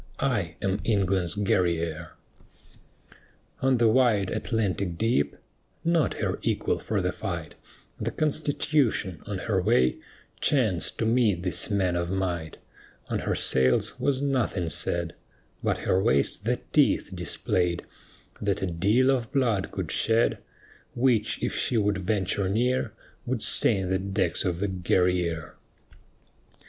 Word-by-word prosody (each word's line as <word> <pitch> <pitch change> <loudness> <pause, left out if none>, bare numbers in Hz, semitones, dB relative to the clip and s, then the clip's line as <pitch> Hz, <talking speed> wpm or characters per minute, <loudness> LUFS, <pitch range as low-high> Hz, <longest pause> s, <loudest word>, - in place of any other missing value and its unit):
I 105 -12 -1
am 95 +1 0
England's 95 -4 +1
Guerrière." 85 -5 0 1.5
On 130 -1 +3
the 115 -1 +4
wide, 110 -5 +3
Atlantic 100 -5 -1
deep 95 -11 +1 0.5
(Not 165 -3 +2
her - - -2
equal - - 0
for - - -2
the - - 0
fight) - - -5 0.5
The - - -1
Constitution, 145 - 0
on 100 -3 -3
her 95 0 0
way, 65 -7 +3 0.4
Chanced 110 - +2
to 115 - -1
meet 110 -6 +2
these 90 +3 +3
men 95 -4 +1
of 85 0 -1
might; 90 -4 -2 0.5
On - - -1
her - - -1
sails 65 -1 +2
was 140 -1 0
nothing 120 -11 0
said, 85 +2 -1 0.5
But - - 0
her 95 - +2
waist 70 -7 +1
the - - 0
teeth - - +3
displayed 90 -1 -1 0.6
That 100 -2 -1
a - - +2
deal 100 +10 +2
of 125 -2 -1
blood 120 -9 +1
could - - -4
shed, 115 +1 +2 0.6
Which, 120 -4 +1
if - - -1
she 120 - 0
would 105 -2 +1
venture 95 0 0
near, 120 +2 0 0.4
Would 120 -2 -1
stain 95 -5 +1
the 95 - +1
decks 95 -3 -1
of 90 -1 -1
the 100 - +1
Guerrière. 90 -3 0
100 Hz, 135 wpm, -26 LUFS, 90-115 Hz, 1.5 s, the